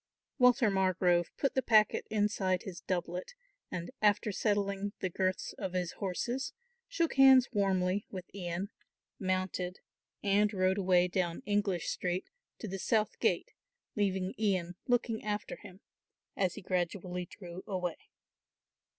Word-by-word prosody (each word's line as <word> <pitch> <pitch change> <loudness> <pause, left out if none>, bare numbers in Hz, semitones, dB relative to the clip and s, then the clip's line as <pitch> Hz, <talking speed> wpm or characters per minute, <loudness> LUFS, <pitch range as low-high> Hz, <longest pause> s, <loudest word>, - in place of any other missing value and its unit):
Walter 250 -3 +5
Margrove 185 -2 +2
put 275 - +1
the 265 - +2
packet 215 -3 +4
inside 205 -3 +1
his 190 -5 -7
doublet, 180 - -3 0.3
and, 175 +6 -5
after 210 +1 +3
settling 200 -1 0
the 185 - -2
girths 185 +1 -1
of 185 - -3
his 180 -2 -1
horses, 235 +7 -2 0.3
shook 335 -10 0
hands 265 -1 +8
warmly 195 -2 +1
with 185 -2 -6
Ian, 185 +1 -4 0.5
mounted 185 -1 -1 0.5
and 205 +1 +3
rode 185 +1 +2
away 180 -2 +4
down 175 -2 -1
English 205 -4 0
Street 180 0 -2 0.3
to 220 - -6
the 195 0 -4
South 215 +2 +1
Gate, - - +1 0.4
leaving 190 -2 0
Ian 185 -5 +1
looking 245 -2 +1
after 210 0 -3
him, 185 +1 -13 0.5
as 185 -2 0
he 210 - -8
gradually 180 0 -2
drew 180 -1 -9
away. 180 -4 -2
190 Hz, 135 wpm, -32 LUFS, 180-210 Hz, 0.5 s, hands